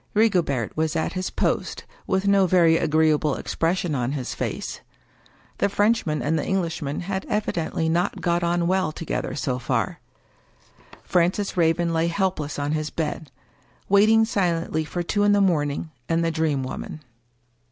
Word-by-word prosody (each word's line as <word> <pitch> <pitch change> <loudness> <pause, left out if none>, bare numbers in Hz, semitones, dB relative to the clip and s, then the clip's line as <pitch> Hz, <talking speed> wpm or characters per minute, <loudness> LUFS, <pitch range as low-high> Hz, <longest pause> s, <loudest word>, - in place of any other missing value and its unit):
Rigobert 175 - +1
was 160 0 0
at 160 - -1
his 185 -1 -2
post, - - -1 0.2
with 190 +1 0
no 200 -1 +4
very 170 -2 +5
agreeable 155 -2 +2
expression 170 0 -1
on 125 0 -1
his 130 -4 -4
face. - - -4 0.8
The - - +2
Frenchman 205 -7 +1
and 160 +2 +1
the - - -2
Englishman 170 -6 -2
had 190 +1 -3
evidently 170 -6 -1
not 170 +3 0
got 175 0 +1
on 170 0 +1
well 185 -1 +1
together 160 +1 -4
so 125 -2 -2
far. 120 -5 -1 1.0
Francis 180 +3 +1
Raven 170 0 +2
lay 165 +1 +1
helpless 170 -5 -1
on 145 0 -1
his 155 0 -1
bed; 155 -1 -4 0.6
waiting 215 +3 +5
silently 170 -6 0
for 175 +3 -3
two 205 +4 0
in 205 0 +4
the 205 - +4
morning 155 -5 0 0.2
and 165 0 +1
the 165 - +1
Dream 160 -4 0
Woman. 140 +3 -6
165 Hz, 150 wpm, -24 LUFS, 155-185 Hz, 1.0 s, very